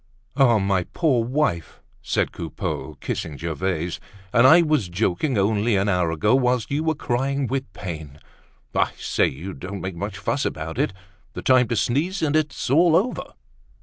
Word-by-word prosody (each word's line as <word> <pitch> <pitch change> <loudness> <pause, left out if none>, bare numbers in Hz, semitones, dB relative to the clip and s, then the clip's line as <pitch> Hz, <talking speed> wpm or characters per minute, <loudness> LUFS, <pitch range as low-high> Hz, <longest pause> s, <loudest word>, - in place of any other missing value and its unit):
"Ah, 125 -5 +5
my 95 -3 +1
poor 135 -9 +2
wife!" 125 - -1 0.2
said - - 0
Coupeau, 80 -1 -5
kissing 75 -3 -4
Gervaise. 85 +1 -2 0.3
"And 125 +2 +6
I 165 +5 +7
was 150 - +1
joking 105 - 0
only 105 +2 +2
an 100 +1 +1
hour 90 -4 +2
ago, 80 +8 +1
whilst 125 -2 +1
you 145 +3 0
were 160 -1 +1
crying 135 +2 -1
with 130 -2 -3
pain! 80 -7 -7 0.6
I - - +1
say, - - +1
you 85 +8 -6
don't 100 +2 -7
make 95 -1 -4
much 100 +2 -5
fuss 95 - -1
about 80 +1 -4
it—the 95 -1 -5
time 130 -2 +4
to 115 - -1
sneeze 160 - 0
and 150 -1 +1
it's 155 -4 0
all 165 +3 +5
over." 220 +9 -1
110 Hz, 165 wpm, -23 LUFS, 90-140 Hz, 0.6 s, I